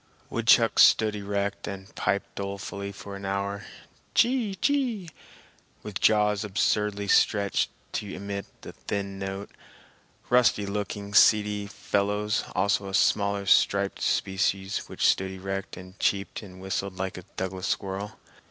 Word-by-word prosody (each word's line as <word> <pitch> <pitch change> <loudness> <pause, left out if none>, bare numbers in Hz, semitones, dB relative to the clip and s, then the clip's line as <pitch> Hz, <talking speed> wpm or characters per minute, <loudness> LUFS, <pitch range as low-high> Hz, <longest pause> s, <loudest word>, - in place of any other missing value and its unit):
Woodchucks - - +4
stood 110 -1 +5
erect 100 0 -3
and 100 0 -7
piped 100 - -1
dolefully 100 0 -5
for 100 0 -9
an 100 - -9
hour 100 +1 -2 0.5
"Chee 235 -5 +2
chee!" 240 - 0 0.7
with 105 -3 -5
jaws 105 -1 +3
absurdly 105 0 0
stretched 100 0 +3 0.2
to 100 - -3
emit 100 +1 -5 0.2
so - - -8 0.2
thin 100 -1 -3
a - - -2
note—rusty 100 +3 -2
looking, 100 0 -4
seedy 105 -1 +4
fellows, 105 +1 -1
also 100 +1 +1
a 95 - -2
smaller 100 -1 +2
striped 100 0 +3
species 95 0 0
which - - -1
stood 95 0 +3
erect 95 +1 -5
and 90 +1 -12
cheeped 100 -1 0
and 95 -3 -12
whistled 95 0 -3
like 95 0 -3
a - - -12
Douglas 95 0 -3
squirrel. 100 +2 -3
100 Hz, 130 wpm, -27 LUFS, 95-105 Hz, 0.7 s, stood